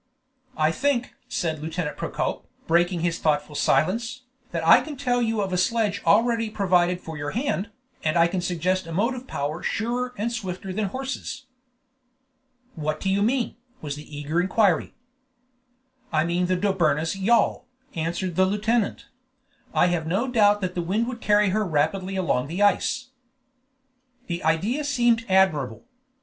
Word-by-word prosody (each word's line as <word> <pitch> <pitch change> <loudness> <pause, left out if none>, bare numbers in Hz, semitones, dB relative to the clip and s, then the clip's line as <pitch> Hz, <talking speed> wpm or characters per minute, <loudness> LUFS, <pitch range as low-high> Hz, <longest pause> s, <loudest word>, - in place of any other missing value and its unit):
"I 155 +1 +3
think," 250 - 0 0.2
said 160 -3 -2
Lieutenant 160 0 -3
Procope, - - -3 0.2
breaking 175 +1 +2
his 170 0 0
thoughtful 150 -1 0
silence, 225 - +1 0.3
"that 165 -1 -3
I 240 - +8
can 295 +1 -7
tell 245 -2 +1
you 225 -2 0
of 190 -2 -2
a 180 - +1
sledge 210 0 +1
already 230 +1 +3
provided 180 -3 +2
for 160 -3 -8
your 145 0 -3
hand, 235 -5 -1 0.3
and 155 +2 +1
I 170 - +6
can 180 +1 -2
suggest 180 +1 -1
a - - -7
motive 245 +7 -1
power 150 +4 -3
surer 245 +2 -2
and 225 +4 -1
swifter 190 -4 -5
than 215 +2 -1
horses." 265 +4 -5 1.3
"What 155 -1 -3
do 190 - -1
you 200 +1 +1
mean?" 240 +3 0 0.2
was 145 -2 -5
the 150 0 -10
eager 150 +4 0
inquiry. 185 -2 +2 1.2
"I 155 -1 +2
mean 175 +1 0
the 185 0 +1
Dobryna's 170 -4 +1
yawl," 230 +5 +2 0.3
answered 170 +2 -2
the 185 +1 +4
lieutenant; 210 +2 0 0.6
"and - - -2
I - - +7
have 165 -2 -1
no 195 +10 0
doubt 210 -4 +4
that 185 -1 -2
the 175 - -2
wind 200 +7 0
would 240 -2 -7
carry 210 -1 +3
her 215 +3 +1
rapidly 185 +3 0
along 155 -9 0
the 175 +7 -1
ice." 255 +5 +1 1.1
The 170 -3 -4
idea 195 - +1
seemed 240 -5 +2
admirable. 155 -11 +2
190 Hz, 160 wpm, -25 LUFS, 165-230 Hz, 1.3 s, I